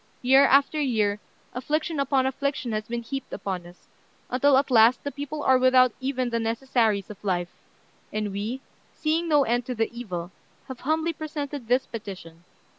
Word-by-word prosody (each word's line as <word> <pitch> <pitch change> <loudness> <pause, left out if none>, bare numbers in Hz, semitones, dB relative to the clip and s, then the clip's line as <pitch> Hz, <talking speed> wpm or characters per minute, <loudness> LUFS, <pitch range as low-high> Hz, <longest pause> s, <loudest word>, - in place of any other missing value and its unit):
Year 265 +2 +6
after 280 +3 +3
year, 215 -6 +1 0.3
affliction 305 +5 -2
upon 275 -1 +2
affliction 265 -2 -2
has 215 0 -3
been 235 0 -4
heaped 270 +3 -6
upon 185 -3 -4
us, 175 +1 -18 0.4
until 265 +2 +4
at 275 0 +1
last 230 +1 +5
the 285 - -3
people 290 +1 -5
are 260 -1 +4
without 255 -1 +5
even 260 -2 -2
the 230 - 0
necessaries 225 -3 0
of 210 - -13
life; 175 -3 -1 0.6
and 210 -1 -2
we, 215 +7 -4 0.3
seeing 325 +2 0
no 295 -2 +5
end 240 0 -1
to 250 - -3
the 225 +1 -2
evil, 180 -7 -5 0.4
have 260 - -7
humbly 320 +3 0
presented 290 -4 -5
this 250 +2 +2
petition. 185 -7 -9
255 Hz, 170 wpm, -25 LUFS, 215-280 Hz, 0.6 s, Year